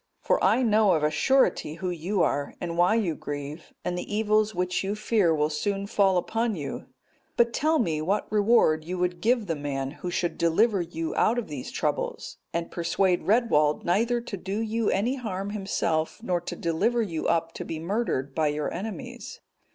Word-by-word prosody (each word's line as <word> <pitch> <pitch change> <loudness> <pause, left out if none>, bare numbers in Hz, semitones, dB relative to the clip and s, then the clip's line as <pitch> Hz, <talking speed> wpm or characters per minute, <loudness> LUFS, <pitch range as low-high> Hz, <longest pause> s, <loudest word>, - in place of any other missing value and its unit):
For - - +1
I 255 - +4
know 215 -3 +4
of 155 - +1
a 150 - +2
surety 260 - +2
who 180 +1 -3
you 175 +2 0
are, 145 0 -1
and 170 -1 -4
why 175 +5 +4
you 200 -8 +1
grieve, 145 +2 -7
and 180 - -1
the 180 - -5
evils 215 -1 +2
which 180 +1 0
you 200 +2 -2
fear 210 -4 +2
will 150 -1 +1
soon 195 +6 -1
fall 200 -3 +3
upon 225 +5 0
you. 145 -5 -6 0.5
But 235 0 +3
tell 315 +5 +2
me, 160 - 0
what 195 +6 0
reward 205 -7 +4
you 180 +3 -4
would 175 -1 -1
give 235 -1 +2
the 165 -4 -1
man 135 -2 -3
who 180 - -6
should 175 0 -2
deliver 195 +5 +3
you 165 -1 -4
out 230 - +2
of 240 - -3
these 140 -4 -6
troubles, - - -3
and 170 0 -3
persuade 175 +2 0
Redwald 190 -10 +3
neither 230 +7 +2
to 225 -4 -6
do 195 +3 -4
you 225 0 0
any 235 +8 0
harm 200 -5 -4
himself, 170 -6 -1
nor 180 -6 0
to - - -5
deliver 210 +9 +1
you 165 -7 -3
up 165 0 +1
to - - -5
be 160 - -5
murdered 165 - -2
by 155 0 +1
your 150 0 -2
enemies." 240 +6 -6
185 Hz, 190 wpm, -26 LUFS, 165-215 Hz, 0.5 s, I